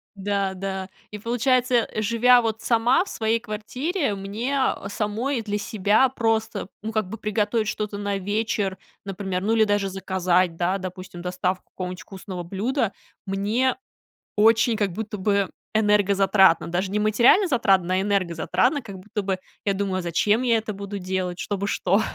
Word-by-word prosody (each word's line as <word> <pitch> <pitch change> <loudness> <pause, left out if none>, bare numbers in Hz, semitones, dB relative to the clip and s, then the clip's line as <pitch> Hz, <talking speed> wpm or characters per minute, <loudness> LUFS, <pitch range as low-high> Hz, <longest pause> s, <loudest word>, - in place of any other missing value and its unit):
Да, 200 -1 -1
да, 190 0 -4 0.2
и 210 - -5
получается, 245 +3 +1
э, 225 -2 0
живя 240 +3 +5
вот 225 -1 -2
сама 240 +8 +3
в - - -10
своей 225 +1 0
квартире, 250 - -2
мне, 220 +8 -3 0.2
э, 195 - -7
самой 230 +5 -1
для 205 -1 -2
себя 210 +4 +2
просто, 225 -5 -1
ну, 220 +1 -4
как 215 -4 -1
бы 225 - -6
приготовить 215 +1 0
что-то 210 -1 -3
на 200 -1 -2
вечер, 205 -1 -1 0.3
например, 190 -1 -3
ну, 220 +2 +1
или 220 - +5
даже 205 -2 +1
заказать, 185 -2 +1
да, 180 +2 +1
допустим, 185 -1 -8
доставку 180 +1 -3
какого-нибудь 180 -1 -6
вкусного 190 -2 -7
блюда, 210 +5 -1 0.3
мне 210 +7 0 0.6
очень 225 +1 +4
как 205 -4 0
будто 210 0 -5
бы 200 0 +1 0.2
энергозатратно, 200 -4 +4
даже 180 +3 -1
не 210 - 0
материально 235 - +4
затратно, 195 - +2
а, 190 - +2
энергозатратно, 195 - +1
как 200 -4 -9
будто 210 +3 -4
бы 190 -1 -1 0.3
я 200 - +2
думаю: 190 -1 -1
"А - - -2
зачем 205 +7 +1
я 235 -3 +3
это 220 -1 -4
буду 200 +1 -6
делать? 185 -1 -3
Чтобы 200 -1 -2
что? 195 +1 +2
205 Hz, 165 wpm, -24 LUFS, 190-225 Hz, 0.6 s, живя